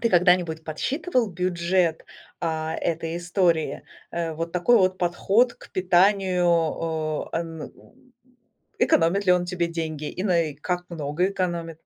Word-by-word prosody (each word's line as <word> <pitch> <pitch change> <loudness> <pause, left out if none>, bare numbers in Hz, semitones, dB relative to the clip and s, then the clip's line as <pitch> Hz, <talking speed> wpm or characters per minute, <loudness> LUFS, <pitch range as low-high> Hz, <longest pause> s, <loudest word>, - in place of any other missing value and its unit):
Ты 230 - +2
когда-нибудь 175 -4 +3
подсчитывал 255 - -1
бюджет, 175 -1 0 0.4
а, 160 -1 -2
этой 165 0 -2
истории? 175 -2 0 0.3
Э, 170 -1 -2
вот 165 +2 -4
такой 180 +8 +3
вот 185 -3 +2
подход 195 +7 +2
к - - -16
питанию, 175 -4 +1
э, - - 0
эм, 165 -2 -6 1.1
экономит 180 +5 +3
ли - - +5
он 180 0 +2
тебе 175 -1 -2
деньги 160 -3 -4
и 185 - -5
нае 170 -7 +1
как 180 +3 -3
много 160 +3 -1
экономит? 175 -4 -2
175 Hz, 130 wpm, -24 LUFS, 165-185 Hz, 1.1 s, ли